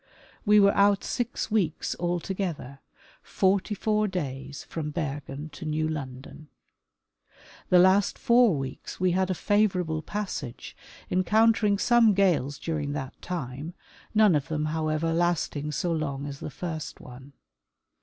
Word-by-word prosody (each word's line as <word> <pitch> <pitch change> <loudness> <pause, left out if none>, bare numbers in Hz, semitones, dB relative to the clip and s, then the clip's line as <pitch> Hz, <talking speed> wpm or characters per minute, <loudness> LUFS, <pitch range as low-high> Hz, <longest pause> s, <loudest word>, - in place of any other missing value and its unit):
We 210 0 +7
were 200 0 +5
out 200 0 +3
six 240 -2 -3
weeks 185 -8 0
altogether, 175 -5 -3 0.4
forty 195 +2 +1
four 215 +1 +1
days 140 -7 -5
from 155 -2 -5
Bergen 145 -1 -5
to 155 +4 -10
New 155 0 0
London. 140 0 -7 1.2
The 180 - +6
last 190 +2 +4
four 235 -6 +4
weeks 135 -1 -6
we 185 -1 +2
had 185 +1 +1
a 185 - 0
favor 205 -1 +2
able 160 -2 -3
passage, 165 - -5 0.4
encountering 210 +2 +3
some 230 -1 +4
gales 165 -8 +2
during 150 -3 -3
that 135 -2 -6
time, 150 0 -5 0.4
none 215 -3 +6
of 150 0 0
them, 155 -2 -2
however, 160 +1 0
lasting 165 -3 0
so 170 +4 -1
long 145 -4 -2
as 140 -1 -7
the - - -5
first 160 +1 -6
one. 130 +3 -12
165 Hz, 135 wpm, -27 LUFS, 145-195 Hz, 1.2 s, We